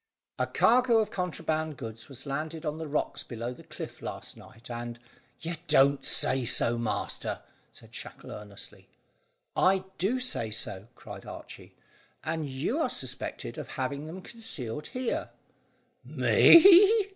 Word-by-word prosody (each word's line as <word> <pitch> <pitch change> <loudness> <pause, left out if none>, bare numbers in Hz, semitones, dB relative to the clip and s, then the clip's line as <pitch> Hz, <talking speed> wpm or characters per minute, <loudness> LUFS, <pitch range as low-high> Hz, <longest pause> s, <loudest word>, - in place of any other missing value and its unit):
"A - - +1
cargo 245 0 +4
of 220 -1 +1
contraband 160 -4 -2
goods 115 0 -8
was 130 0 -9
landed 155 +3 -4
on 150 +1 -2
the 160 - -4
rocks 150 +1 -1
below 120 +1 -5
the - - -13
cliff - - -8
last - - -6
night, 115 +2 -14
and 120 0 -5 0.2
" 130 -1 -36
"You 165 +1 -4
don't 140 +1 +5
say 130 0 +2
so, 115 0 +2
master!" 110 -2 -2 0.3
said - - -15
Shackle - - -9
earnestly. 105 -1 -9 0.7
"I 190 0 +4 0.2
do 220 +8 +1
say 250 - -1
so," 105 -2 -3
cried - - -10
Archy; - - -10 0.5
"and 160 -1 -2
you 145 - -1
are 320 - +1
suspected - - -4
of - - -6
having 140 +2 -3
them 180 +4 -8
concealed 150 - -5
here." 255 -1 -2 0.7
"Me!" 395 +4 +7
150 Hz, 145 wpm, -29 LUFS, 120-190 Hz, 0.7 s, Me